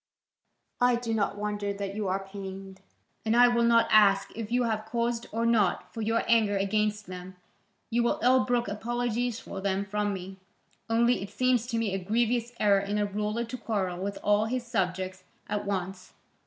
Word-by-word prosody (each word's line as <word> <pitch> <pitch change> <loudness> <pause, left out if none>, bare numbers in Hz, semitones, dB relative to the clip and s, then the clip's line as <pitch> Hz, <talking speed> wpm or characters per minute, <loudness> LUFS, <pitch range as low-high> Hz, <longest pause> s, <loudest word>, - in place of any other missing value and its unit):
I 245 0 +4
do 235 -1 -2
not 205 -2 0
wonder 205 -1 -2
that 200 -1 -4
you 210 -1 -2
are 195 +1 -1
pained, 195 -1 -8 0.4
and 225 +1 +2
I 245 0 +8
will 240 -1 +2
not 235 0 +4
ask 200 -2 +5
if 225 0 -5
you 245 +1 +2
have 220 -2 -2
cause 235 0 -1
or 230 +1 -1
not 215 -6 +1
for 225 - -5
your 225 +1 +1
anger 220 -3 +3
against 210 +1 0
them: 185 0 -9 0.6
you 240 +1 +2
will 235 - +1
ill 255 +1 +5
brook 245 -2 0
apologies 240 +2 -2
for 195 - -7
them 195 0 0
from 205 +1 -1
me. 190 0 -6 0.5
Only 235 +1 +3
it 195 - -6
seems 245 +1 +1
to 235 -2 -2
me 225 -4 0
a 195 - -1
grievous 235 +3 0
error 200 -2 +4
in 200 +1 -2
a 210 - +1
ruler 210 +3 -2
to 255 +2 -6
quarrel 195 -6 -2
with 200 +1 -3
all 210 +1 +3
his 245 +2 -2
subjects 185 -4 -2 0.2
at 205 0 -2
once. 190 -1 -4
210 Hz, 190 wpm, -28 LUFS, 195-235 Hz, 0.6 s, I